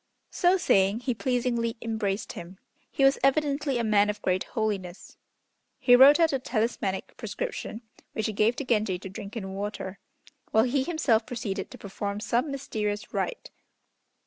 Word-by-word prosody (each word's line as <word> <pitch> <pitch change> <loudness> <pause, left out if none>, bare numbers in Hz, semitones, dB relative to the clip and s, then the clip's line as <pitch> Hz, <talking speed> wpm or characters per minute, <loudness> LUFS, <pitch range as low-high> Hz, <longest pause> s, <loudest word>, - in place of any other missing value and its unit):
So 365 +1 +3
saying, 200 - +2
he 250 0 -1
pleasingly 235 -1 -1
embraced 220 -3 -2
him. 175 +2 -9 0.3
He 275 - -1
was 270 0 +5
evidently 280 -1 +2
a 235 - 0
man 210 -2 +3
of 210 0 -3
great 185 0 +1
holiness. 200 -5 -4 0.6
He 245 - +6
wrote 275 +5 +8
out 325 -3 +4
a 270 - +1
talismanic 220 -5 -2
prescription, 255 - -5 0.3
which 220 - -2
he 215 - -1
gave 215 +4 +2
to 280 - -4
Genji 215 -6 +1
to 190 - -8
drink 200 +2 -8
in 190 -3 -5
water, 200 -1 -5 0.5
while 220 - +4
he 260 +3 +1
himself 265 -9 +1
proceeded 215 -5 -4
to - - -11
perform 200 0 -4
some 240 +6 0
mysterious 215 -7 -3
rite. - - -3
225 Hz, 160 wpm, -27 LUFS, 205-265 Hz, 0.6 s, wrote